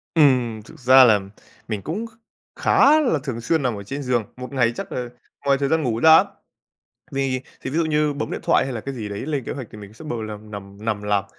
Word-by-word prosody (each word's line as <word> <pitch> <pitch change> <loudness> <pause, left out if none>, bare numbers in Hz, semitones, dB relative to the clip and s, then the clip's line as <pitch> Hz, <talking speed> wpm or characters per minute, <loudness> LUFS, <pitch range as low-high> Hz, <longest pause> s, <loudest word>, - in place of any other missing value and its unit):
Ừm, 125 -8 +3
thực - - -15
ra 130 +1 +7
là 110 -4 +5 0.5
mình 105 -3 -3
cũng 195 - -4
kh - - -17 0.5
khá 300 +3 +5
là 245 - +1
thường 125 -5 -4
xuyên 160 +7 +1
nằm 125 -3 0
ở 100 - -7
trên 140 +8 -5
giường, 125 -3 +1
một 125 +1 -7
ngày 125 -3 +2
chắc - - -6
là 125 -1 -4 0.4
ngoài 140 -1 +3
thời 140 0 -1
gian 160 0 +2
ngủ 115 -4 -1
ra 160 +4 +8
á. - - +5 0.9
Vì 135 -2 -1 0.2
thì 130 - -5
ví 145 - -3
dụ 165 - +2
như 150 -1 +1
bấm 145 +1 -4
điện - - -4
thoại - - +3
hay 130 -1 -4
là 115 - -4
cái 135 +4 -6
gì 110 -4 -5
đấy 100 0 -5
lên 145 -5 -2
kế - - -4
hoạch 130 -3 -6
thì 110 - -11
mình 100 -1 -11
sẽ 120 +9 -13
bầu 120 -7 -4
lằm 105 0 -8
nằm 100 0 -9
nằm 110 -2 -1
làm, 105 -1 0
125 Hz, 260 wpm, -22 LUFS, 110-145 Hz, 0.9 s, ra